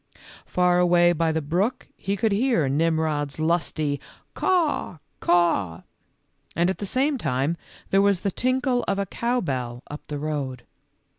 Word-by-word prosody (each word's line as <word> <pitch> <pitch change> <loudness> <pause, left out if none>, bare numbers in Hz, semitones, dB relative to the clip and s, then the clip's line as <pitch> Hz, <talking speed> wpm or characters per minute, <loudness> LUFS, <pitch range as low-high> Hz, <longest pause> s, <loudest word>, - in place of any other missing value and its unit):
Far 180 0 +3
away 175 -1 +5
by 165 0 +1
the 160 -1 -1
brook 195 - -1
he 200 +1 -3
could 220 +2 +1
hear 210 - +2
Nimrod's 155 0 0
lusty 155 -3 0 0.2
" - - -35
caw, 330 - 0 0.2
caw," 165 - +2 0.7
and 175 +2 +2
at - - -7
the 205 - -3
same 270 +5 +1
time 140 - 0 0.4
there 195 - +5
was 200 -3 +2
the 200 - -1
tinkle 255 +2 0
of 195 - 0
a 200 - 0
cow 240 +5 -1
bell 125 -6 -3
up 150 - -6
the 150 - -4
road. 140 -4 -3
175 Hz, 155 wpm, -24 LUFS, 150-200 Hz, 0.7 s, away